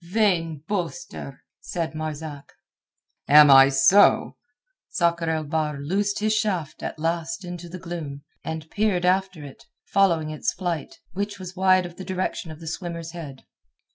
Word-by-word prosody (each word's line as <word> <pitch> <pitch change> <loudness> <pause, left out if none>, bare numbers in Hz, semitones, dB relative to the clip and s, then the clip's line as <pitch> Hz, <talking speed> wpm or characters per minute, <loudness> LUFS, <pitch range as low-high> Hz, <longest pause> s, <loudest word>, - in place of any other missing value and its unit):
"Vain 170 -6 0
boaster," 175 -6 -5 0.2
said 165 -2 -4
Marzak. 155 -2 -6 0.7
"Am 150 0 +8
I 135 0 +9
so?" 140 +10 +5 0.5
Sakr 170 -1 +1
el 160 -1 0
Bahr 150 -1 -2
loosed 200 +8 -1
his 215 +1 +1
shaft 190 -8 -1
at - - -5
last 170 +6 -2
into 175 -1 -7
the 185 - -7
gloom, 165 -6 -6 0.2
and 160 -1 -5
peered 205 -4 +1
after 185 -4 +1
it 135 - -13 0.2
following 170 -6 +2
its 155 - -2
flight, 175 - -4 0.2
which 205 +1 -3
was 185 -1 -8
wide 185 -1 +4
of 175 0 -10
the 190 - -7
direction 185 -2 -3
of 155 -1 -9
the 165 - -10
swimmer's 170 0 -5
head. 150 -6 -9
170 Hz, 150 wpm, -24 LUFS, 155-185 Hz, 0.7 s, I